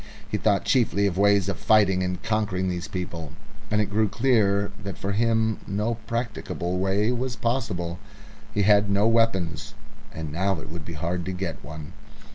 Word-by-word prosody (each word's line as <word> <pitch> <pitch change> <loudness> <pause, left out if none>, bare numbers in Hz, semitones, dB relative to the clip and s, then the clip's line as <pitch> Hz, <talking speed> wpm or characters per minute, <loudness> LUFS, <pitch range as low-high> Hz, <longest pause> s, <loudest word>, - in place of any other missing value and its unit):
He - - -3
thought 100 -2 +2
chiefly 110 -5 +2
of 95 -4 +1
ways 100 -1 +4
of 100 - -2
fighting 100 -4 +4
and 90 -1 -2
conquering 105 -4 0
these 90 +1 -3
people, 85 -6 -5 0.4
and 105 - +2
it 105 - +3
grew 110 +1 +3
clear 105 -4 +2
that 100 0 -5
for 100 - -3
him 110 +1 +1
no 105 +3 0
practicable 110 -6 -2
way 100 +4 +2
was 125 0 -2
possible. 110 -8 -2 0.5
He 105 - +1
had 105 0 +5
no 100 +2 +3
weapons, 115 -7 +1 0.4
and 80 -2 -6
now 95 +3 0
it - - -9
would 85 -2 -7
be 85 - -6
hard 85 +3 -2
to 95 - -3
get 90 -3 -4
one. 80 -1 -8
100 Hz, 175 wpm, -25 LUFS, 90-110 Hz, 0.5 s, had